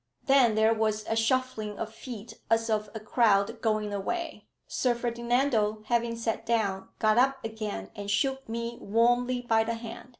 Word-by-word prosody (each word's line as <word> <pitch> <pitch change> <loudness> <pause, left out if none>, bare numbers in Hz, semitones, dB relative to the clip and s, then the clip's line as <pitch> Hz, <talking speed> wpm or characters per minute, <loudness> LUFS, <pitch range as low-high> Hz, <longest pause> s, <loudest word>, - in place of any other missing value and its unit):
Then 270 -5 +5
there 220 +1 +4
was 215 -1 0
a 225 - 0
shuffling 225 -3 0
of 220 0 -5
feet 225 -1 -8 0.2
as 225 0 +2
of 210 -1 0
a - - -3
crowd 215 0 +2
going 215 -2 0
away. 330 - -4 0.2
Sir 245 -2 0
Ferdinando 235 -2 0
having 235 -1 +1
sat 230 -1 -2
down, 200 -5 -1
got 215 +1 +3
up 270 +2 +3
again 215 - -5
and 205 0 -6
shook 270 +4 0
me 235 +1 -4
warmly 245 +3 +2
by 225 -2 +3
the 230 +1 -2
hand. 230 +2 -9
225 Hz, 165 wpm, -28 LUFS, 215-240 Hz, 0.2 s, Then